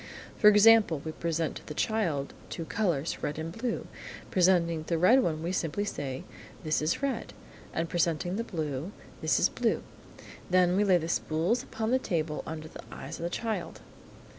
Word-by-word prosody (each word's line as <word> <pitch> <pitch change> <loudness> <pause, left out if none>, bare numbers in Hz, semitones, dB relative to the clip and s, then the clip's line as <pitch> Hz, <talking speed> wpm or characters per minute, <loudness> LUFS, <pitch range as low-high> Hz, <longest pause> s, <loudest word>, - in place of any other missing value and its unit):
For 210 - +5
example, 210 -5 +7
we 160 - -2
present 165 0 -2
to - - -13
the 150 - -6
child, 170 -12 0 0.2
two 165 - -5
colours, 170 -4 -1
red 150 - -2
and 160 +1 -4
blue. 235 0 -2 0.5
Presenting 175 -3 +3
the 170 - +1
red, 230 +11 +6
we 165 -3 -1
say - - -1 0.2
simply, 145 -9 -3 0.2
" - - -18
This 155 -2 +1
is 155 - 0
red," 275 -1 -2 0.4
and 165 +1 -1
presenting 175 +1 0
the 230 - -1
blue, 155 - -4 0.3
"This - - +2
is - - +5
blue." - - 0 0.7
Then, 180 0 +4
we 205 - +3
lay 190 -3 +5
the 165 -1 -3
spools 170 +8 0
upon 225 -3 -3
the 260 - +4
table 160 -9 -2
under 155 0 -5
the - - -10
eyes - - -7
of - - -5
the - - -1
child. 225 +4 -3
170 Hz, 180 wpm, -29 LUFS, 160-210 Hz, 0.7 s, example